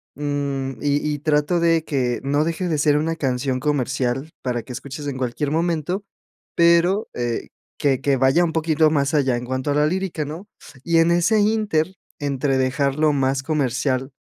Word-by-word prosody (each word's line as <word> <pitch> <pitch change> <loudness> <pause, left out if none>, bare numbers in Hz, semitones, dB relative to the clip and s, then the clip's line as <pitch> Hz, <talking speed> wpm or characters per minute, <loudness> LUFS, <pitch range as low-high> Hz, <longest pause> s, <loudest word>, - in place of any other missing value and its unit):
mm, 140 -2 -2
y 145 +1 0
y 145 - -4
trato 150 +3 +1
de 165 -1 +3
que 125 -6 -1
no 145 +2 +1
deje 170 +3 -2
de 155 -3 0
ser 145 0 +3
una 165 +2 -1
canción 130 -3 -1
comercial, 135 0 -1
para 120 -2 -1
que 125 +3 -9
escuches 140 +3 -7
en 135 -2 -3
cualquier 130 +3 -2
momento, 170 +3 -1 0.5
pero 170 +4 +4
eh, 120 -1 -3 0.3
que 135 -2 +1
que 140 -1 +2
vaya 135 +7 +4
un 160 - -1
poquito 160 -1 +2
más 140 -1 +1
allá 135 -4 +2
en 120 +1 -4
cuanto 130 +3 -2
a - - +2
la 150 +1 +3
lírica, 185 -3 -2
¿no?, 160 +7 -8 0.4
y 170 -1 +2
en 165 +1 +4
ese 175 +6 +3
inter 205 -5 +1 0.2
entre 140 -2 0
dejarlo 140 +3 +1
más 135 -1 +1
comercial, 135 -2 -1
145 Hz, 175 wpm, -22 LUFS, 135-165 Hz, 0.5 s, pero